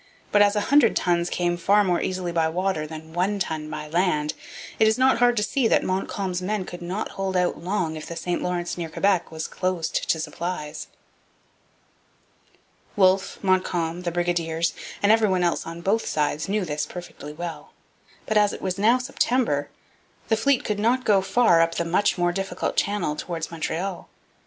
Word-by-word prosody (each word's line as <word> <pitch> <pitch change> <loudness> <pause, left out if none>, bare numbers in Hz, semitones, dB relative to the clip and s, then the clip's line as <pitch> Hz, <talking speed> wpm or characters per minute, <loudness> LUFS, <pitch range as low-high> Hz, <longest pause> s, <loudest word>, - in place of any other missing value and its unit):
But 205 - +5
as 205 0 +4
a 210 - +2
hundred 290 +1 +5
tons 175 -1 +1
came 175 -1 0
far 200 +4 +4
more 180 -3 +1
easily 185 -2 -2
by 165 -1 +1
water 180 -2 -1
than 160 +1 -9
one 190 +4 0
ton 160 -5 -3
by 155 0 -6
land, 150 -2 +1 0.5
it 220 - +5
is 220 - +3
not 260 -2 +4
hard 245 0 +4
to 210 - +2
see 245 +3 +1
that - - +3
Montcalm's 185 -1 -2
men 200 +1 -2
could 175 -1 -8
not 185 +5 -3
hold 190 -1 -2
out 180 -2 0
long 180 -4 -1
if 155 - -7
the 170 - -6
St 175 +1 -2
Lawrence 175 0 -2
near 165 -1 -3
Quebec 190 +2 +1
was 160 0 -4
closed 180 -3 -2
to 160 - +2
supplies. 160 -2 -5 2.1
Wolfe, 190 -1 +3
Montcalm, 180 -3 0
the 175 -1 -2
brigadiers, 170 -1 0 0.3
and 205 - +5
every 220 -1 +4
one 185 -1 +1
else 170 -1 0
on 165 +1 -7
both 210 +5 0
sides 150 +3 -1
knew 205 -1 0
this 150 -2 -2
perfectly 175 -4 -9
well. 170 +2 -7 0.5
But, 215 - +1
as 205 -1 +4
it - - -7
was 190 0 -2
now 225 +5 +5
September, 250 - 0 0.6
the 220 - +4
fleet 255 +4 +2
could 210 -1 -1
not 245 +4 +1
go 200 -3 +4
far 190 -3 +4
up 165 0 +1
the 170 - -1
much 185 +5 +2
more 175 0 +2
difficult 195 +1 -3
channel 200 -7 0
towards 165 0 -5
Montreal. 170 +3 -4
180 Hz, 185 wpm, -24 LUFS, 165-205 Hz, 2.1 s, But